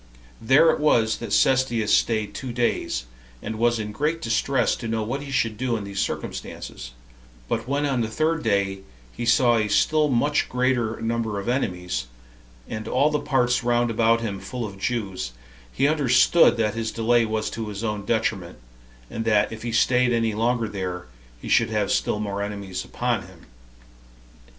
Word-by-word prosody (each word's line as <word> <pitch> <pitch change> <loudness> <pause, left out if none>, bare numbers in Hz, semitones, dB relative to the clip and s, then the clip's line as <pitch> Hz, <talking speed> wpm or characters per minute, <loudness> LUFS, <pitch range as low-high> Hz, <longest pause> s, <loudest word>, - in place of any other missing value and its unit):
There 135 +8 +5
it - - -2
was 115 -7 +3
that 115 - -7
Cestius 125 -5 +2
staid 110 -3 0
two 130 -2 -5
days, 115 - -1 0.3
and 110 - -6
was 120 0 +2
in 105 -1 -4
great 150 +9 -1
distress 125 0 +1
to 115 - -6
know 110 -1 -1
what 130 +6 -3
he 145 - -8
should 115 -5 0
do 125 -2 0
in 105 - -5
these 100 -1 -5
circumstances; - - -5 0.5
but - - -2
when 140 +2 0
on 135 -4 0
the 110 - 0
third 155 +8 0
day 100 -3 0 0.3
he 120 - -4
saw 120 0 +4
a 110 -1 +1
still 155 +7 +3
much 145 +4 +1
greater 125 -3 0
number 115 -2 -1
of 100 - -7
enemies, 90 - -2 0.6
and 110 0 -6
all 140 +4 +2
the 150 - 0
parts 125 -4 +1
round 120 0 +1
about 115 +1 +2
him 100 -4 -3
full 115 +5 -5
of 100 -2 -9
Jews, 95 - -3 0.4
he 135 - +2
understood 145 -1 +4
that 105 -2 +1
his 115 0 -3
delay 115 +1 +2
was 110 -1 -2
to 115 -1 -5
his 105 +1 -6
own 105 -3 -2
detriment, 100 -5 -1 0.5
and 115 - -4
that 105 -2 +2
if 110 -1 -7
he 120 - -4
staid 125 +2 +3
any 115 -2 +1
longer 115 +1 0
there, 90 -3 -5 0.3
he - - -9
should - - +3
have - - 0
still 105 - 0
more 100 -1 -3
enemies 100 -2 -4
upon - - -2
him. - - -16
115 Hz, 180 wpm, -24 LUFS, 105-125 Hz, 0.6 s, There